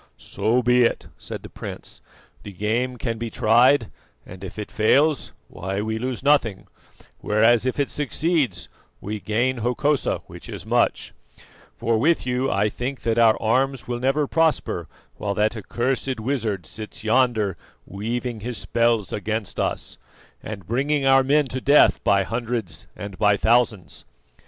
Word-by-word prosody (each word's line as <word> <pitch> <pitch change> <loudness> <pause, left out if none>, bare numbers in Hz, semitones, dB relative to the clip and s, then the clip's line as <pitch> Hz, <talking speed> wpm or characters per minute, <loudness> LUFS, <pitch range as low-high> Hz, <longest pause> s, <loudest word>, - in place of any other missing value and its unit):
"So 120 +3 0
be 125 +1 +4
it," 120 - +1
said - - -8
the - - -9
prince; - - -8 0.4
"the 100 - -9
game 115 +6 -1
can 115 -2 -3
be 115 0 -3
tried, 115 +3 +3 0.3
and 95 +1 -11
if 95 - -8
it 105 - -6
fails, 140 +7 +2 0.2
why 95 +2 -4
we 110 +1 -2
lose 130 +1 -4
nothing, 115 -9 +2 0.5
whereas 115 +3 +3
if 130 - -2
it 140 - 0
succeeds 150 0 0 0.3
we 105 +1 -5
gain 120 +5 0
Hokosa, 125 +5 0
which - - -12
is - - -7
much; - - 0 0.6
for 115 -1 +1
with 160 +5 +2
you 125 +1 0
I 100 +2 +2
think 125 +5 -4
that 115 0 0
our 115 -2 +5
arms 130 +3 0
will 120 -1 -3
never 135 +4 +1
prosper 155 - 0 0.3
while 100 -1 -3
that 105 +3 +1
accursed 125 +4 -2
wizard 110 - -2
sits 110 +3 -9
yonder 110 -4 +2 0.3
weaving 115 +4 -4
his 120 +2 -5
spells 115 -3 0
against 105 -1 -3
us, - - -3 0.4
and 105 -3 -7
bringing 140 +4 0
our 135 0 +6
men 145 +3 +3
to 130 +1 -4
death 145 +3 +5
by 100 -1 +3
hundreds 115 -3 -4
and 100 -2 -8
by 105 -1 +4
thousands." 115 -4 +1
115 Hz, 150 wpm, -23 LUFS, 110-130 Hz, 0.6 s, our